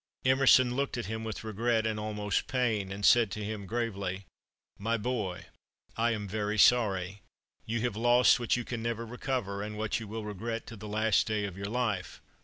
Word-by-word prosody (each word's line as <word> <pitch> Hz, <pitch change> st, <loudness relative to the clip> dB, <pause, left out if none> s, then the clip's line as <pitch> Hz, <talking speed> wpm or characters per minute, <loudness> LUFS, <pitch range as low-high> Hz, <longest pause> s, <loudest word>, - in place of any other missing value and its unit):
Emerson 130 Hz, -1 st, +5 dB
looked 140 Hz, -1 st, -1 dB
at 120 Hz, -, -3 dB
him 110 Hz, +2 st, -4 dB
with 110 Hz, -1 st, -5 dB
regret 110 Hz, +1 st, 0 dB
and 110 Hz, -1 st, -1 dB
almost 105 Hz, -1 st, -2 dB
pain, 110 Hz, -7 st, 0 dB
and 100 Hz, +1 st, -3 dB
said 120 Hz, -3 st, +6 dB
to 105 Hz, +3 st, -5 dB
him, 105 Hz, -2 st, -5 dB
gravely: 100 Hz, -4 st, -3 dB, 0.5 s
"My 115 Hz, +3 st, 0 dB
boy, 110 Hz, -5 st, -3 dB, 0.5 s
I 115 Hz, +1 st, +2 dB
am 105 Hz, -3 st, -2 dB
very 105 Hz, +1 st, -2 dB
sorry; 100 Hz, -5 st, +3 dB, 0.5 s
you 115 Hz, 0 st, -1 dB
have 120 Hz, -3 st, -1 dB
lost 120 Hz, +3 st, +5 dB
what 120 Hz, -, +1 dB
you 120 Hz, -, -4 dB
can 120 Hz, -2 st, -4 dB
never 115 Hz, 0 st, -2 dB
recover, 120 Hz, -4 st, -3 dB
and 105 Hz, +1 st, -5 dB
what 110 Hz, +1 st, -1 dB
you 115 Hz, -, -7 dB
will 110 Hz, +1 st, -5 dB
regret 110 Hz, +3 st, -4 dB
to 115 Hz, -, -9 dB
the 105 Hz, 0 st, -9 dB
last 110 Hz, 0 st, +2 dB
day 105 Hz, -2 st, 0 dB
of 100 Hz, -3 st, -6 dB
your 100 Hz, +1 st, -5 dB
life." 110 Hz, -7 st, -2 dB
110 Hz, 195 wpm, -30 LUFS, 105-120 Hz, 0.5 s, said